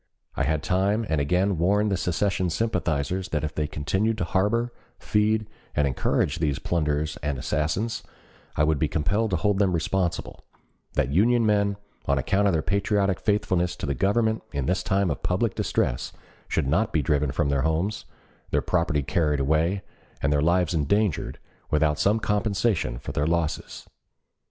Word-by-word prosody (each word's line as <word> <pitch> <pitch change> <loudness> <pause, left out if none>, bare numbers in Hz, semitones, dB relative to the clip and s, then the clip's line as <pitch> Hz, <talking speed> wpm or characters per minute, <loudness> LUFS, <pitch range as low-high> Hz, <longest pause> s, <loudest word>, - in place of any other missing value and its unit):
I - - 0
had 80 -1 0
time 100 +5 +1
and 80 -2 +1
again 90 +5 +1
warned 105 +4 +2
the - - +2
secession 95 +1 0
sympathizers 90 -3 -1
that 75 -2 -1
if 75 - -3
they 75 -1 -1
continued 95 +10 -1
to 95 - -1
harbor, 105 +7 0 0.2
feed, 105 0 +1 0.3
and 75 - +3
encourage 70 +3 0
these 75 -4 0
plunderers 75 -2 -1
and 75 -2 -3
assassins, 85 - -1 0.5
I 75 - +2
would 75 -2 +2
be 80 - +2
compelled 90 +10 0
to 95 - +1
hold 100 +4 +1
them 95 -3 +3
responsible; 85 +1 -2 0.5
that 70 -2 0
Union 115 +8 +3
men, 100 -1 +2 0.3
on 70 - +2
account 95 +10 +2
of 100 - +2
their 80 -1 +1
patriotic 100 -2 +1
faithfulness 95 -4 0
to - - -5
the 70 - 0
Government 110 - +1
in 70 -3 -2
this 90 +6 +1
time 100 -3 +1
of 70 - -4
public - - 0
distress, - - -1 0.4
should 80 - 0
not 100 +11 +1
be 80 - +1
driven 75 0 +1
from 70 +1 0
their 70 -1 +1
homes, 80 +7 -1 0.4
their - - +1
property 85 -5 +1
carried 75 -1 +1
away, 80 +7 +1 0.4
and 70 +1 +1
their 75 - +2
lives 85 +1 +2
endangered, 95 +4 0 0.3
without 75 0 +2
some 105 +3 +3
compensation 100 - 0
for - - -6
their 75 - 0
losses. 85 -2 -2
85 Hz, 170 wpm, -25 LUFS, 75-100 Hz, 0.5 s, and